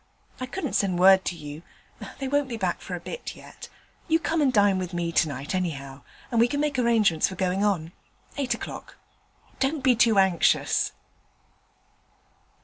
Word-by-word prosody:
I 255 Hz, -, -4 dB
couldn't 300 Hz, -1 st, -4 dB
send 190 Hz, -3 st, +1 dB
word 190 Hz, +1 st, +6 dB
to 175 Hz, -, -2 dB
you; 150 Hz, -1 st, -9 dB, 0.6 s
they 270 Hz, -, -4 dB
won't 285 Hz, 0 st, 0 dB
be 235 Hz, -, -4 dB
back 185 Hz, -5 st, -2 dB
for 180 Hz, -, -5 dB
a -, -, -6 dB
bit 485 Hz, -, -7 dB
yet. -, -, -12 dB, 0.4 s
You 325 Hz, -1 st, +4 dB
come 330 Hz, -1 st, -1 dB
and 275 Hz, -3 st, +3 dB
dine 205 Hz, -4 st, +3 dB
with 180 Hz, -1 st, -5 dB
me 170 Hz, -1 st, -1 dB
tonight, 145 Hz, -3 st, -1 dB
anyhow, 140 Hz, -7 st, -4 dB, 0.3 s
and 235 Hz, -, +1 dB
we 235 Hz, -, +5 dB
can 285 Hz, +3 st, -2 dB
make 290 Hz, -3 st, 0 dB
arrangements 220 Hz, -9 st, +3 dB
for 190 Hz, -, -7 dB
going 185 Hz, +1 st, 0 dB
on. 175 Hz, -6 st, 0 dB, 0.4 s
Eight 255 Hz, -4 st, -1 dB
o'clock. -, -, -8 dB, 0.6 s
Don't 275 Hz, +1 st, 0 dB
be 255 Hz, -2 st, +4 dB
too 225 Hz, -2 st, +3 dB
anxious.' 190 Hz, -3 st, +2 dB
195 Hz, 170 wpm, -25 LUFS, 175-255 Hz, 0.6 s, word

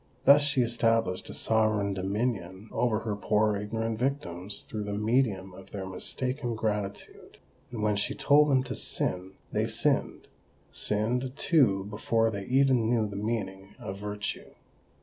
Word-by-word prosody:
Thus 140 Hz, +1 st, +8 dB
she 140 Hz, -3 st, +2 dB
established 115 Hz, -5 st, 0 dB
a -, -, -6 dB
sovereign 110 Hz, -2 st, +2 dB
dominion 95 Hz, 0 st, -3 dB
over 115 Hz, -3 st, +1 dB
her 110 Hz, -2 st, -2 dB
poor 105 Hz, +1 st, +2 dB
ignorant 110 Hz, +2 st, -3 dB
victims 100 Hz, -8 st, -2 dB
through 105 Hz, -2 st, -5 dB
the 105 Hz, 0 st, -3 dB
medium 105 Hz, -4 st, +1 dB
of 95 Hz, +1 st, -13 dB
their 100 Hz, -2 st, -5 dB
mistaken 125 Hz, +7 st, -3 dB
gratitude; 105 Hz, -2 st, -4 dB, 0.3 s
and 115 Hz, -3 st, -5 dB
when 105 Hz, -1 st, +2 dB
she 100 Hz, -, -1 dB
told 150 Hz, +1 st, +4 dB
them 130 Hz, -2 st, +3 dB
to 130 Hz, -, -5 dB
sin, 90 Hz, +1 st, -1 dB, 0.2 s
they -, -, 0 dB
sinned—sinned, 125 Hz, +5 st, -1 dB
too, 125 Hz, -, +3 dB
before 115 Hz, +2 st, 0 dB
they 100 Hz, -2 st, -5 dB
even 130 Hz, -3 st, +3 dB
knew 115 Hz, -3 st, +2 dB
the 100 Hz, -, -8 dB
meaning 100 Hz, -2 st, -4 dB
of 95 Hz, +1 st, -7 dB
virtue! 105 Hz, 0 st, -4 dB
110 Hz, 145 wpm, -28 LUFS, 100-120 Hz, 0.3 s, Thus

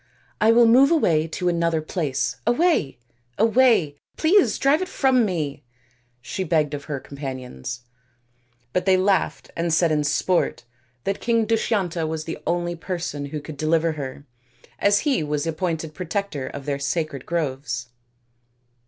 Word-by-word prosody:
" -, -, -29 dB
I 220 Hz, +1 st, +6 dB
will 235 Hz, +1 st, +6 dB
move 255 Hz, +5 st, +6 dB
away 165 Hz, -, +2 dB
to 180 Hz, +2 st, -3 dB
another 170 Hz, -2 st, +1 dB
place. 135 Hz, -6 st, -2 dB
Away! 270 Hz, -, +2 dB, 0.4 s
away! 225 Hz, -, +3 dB, 0.2 s
Please 365 Hz, +5 st, +4 dB
drive 280 Hz, +4 st, +3 dB
it 370 Hz, -, -2 dB
from 265 Hz, -7 st, +3 dB
me," 150 Hz, -7 st, -3 dB, 0.6 s
she 190 Hz, +10 st, -3 dB
begged 155 Hz, -4 st, +1 dB
of 140 Hz, -1 st, -5 dB
her 145 Hz, -3 st, -4 dB
companions; 130 Hz, -, -7 dB, 0.9 s
but 180 Hz, -, 0 dB
they 190 Hz, -1 st, +5 dB
laughed 190 Hz, +1 st, 0 dB
and 170 Hz, 0 st, -1 dB
said 165 Hz, 0 st, +3 dB
in 150 Hz, -1 st, +2 dB
sport 145 Hz, -2 st, 0 dB, 0.4 s
that 195 Hz, -, -2 dB
King 230 Hz, -1 st, +2 dB
Dushyanta 200 Hz, -7 st, 0 dB
was 160 Hz, 0 st, -3 dB
the 165 Hz, -1 st, -6 dB
only 175 Hz, 0 st, 0 dB
person 170 Hz, -4 st, -4 dB
who 150 Hz, +2 st, -5 dB
could 150 Hz, 0 st, -9 dB
deliver 160 Hz, +2 st, +2 dB
her, 145 Hz, -2 st, -7 dB, 0.5 s
as 205 Hz, 0 st, +3 dB
he 280 Hz, -, +1 dB
was 150 Hz, -1 st, -1 dB
the 165 Hz, -, -1 dB
appointed 160 Hz, -1 st, -3 dB
protector 180 Hz, -5 st, -3 dB
of 140 Hz, -1 st, -7 dB
their 140 Hz, -1 st, -2 dB
sacred 140 Hz, -1 st, -2 dB
groves. 135 Hz, -7 st, -2 dB
165 Hz, 155 wpm, -23 LUFS, 145-200 Hz, 0.9 s, I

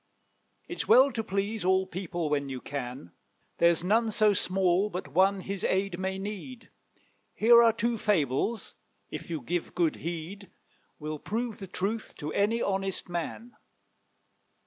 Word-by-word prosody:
It's -, -, -4 dB
well 270 Hz, +2 st, +7 dB
to 225 Hz, -, -2 dB
please 200 Hz, +1 st, -2 dB
all 190 Hz, +1 st, +3 dB
people 175 Hz, -2 st, -4 dB
when 140 Hz, -2 st, 0 dB
you 130 Hz, -1 st, -4 dB
can; 125 Hz, -9 st, -6 dB, 0.5 s
There's 170 Hz, 0 st, +4 dB
none 220 Hz, +5 st, +2 dB
so 215 Hz, -1 st, +3 dB
small 185 Hz, +1 st, +1 dB
but 180 Hz, -6 st, -5 dB
one 190 Hz, +6 st, +3 dB
his 195 Hz, 0 st, -5 dB
aid 190 Hz, -1 st, 0 dB
may 190 Hz, 0 st, -2 dB
need. 210 Hz, +5 st, -7 dB, 0.6 s
Here 235 Hz, +2 st, +7 dB
are 230 Hz, -1 st, +6 dB
two 230 Hz, +1 st, -1 dB
fables, 195 Hz, -, 0 dB, 0.4 s
if -, -, -6 dB
you 160 Hz, -3 st, -3 dB
give 170 Hz, +7 st, -3 dB
good 170 Hz, -3 st, +1 dB
heed, 170 Hz, +4 st, -6 dB, 0.5 s
Will 155 Hz, 0 st, -5 dB
prove 225 Hz, +3 st, -3 dB
the 195 Hz, -, -7 dB
truth 205 Hz, +5 st, -3 dB
to 150 Hz, 0 st, -5 dB
any 220 Hz, +4 st, +1 dB
honest 195 Hz, -1 st, -2 dB
man. 195 Hz, +7 st, -5 dB
190 Hz, 145 wpm, -29 LUFS, 170-215 Hz, 0.6 s, well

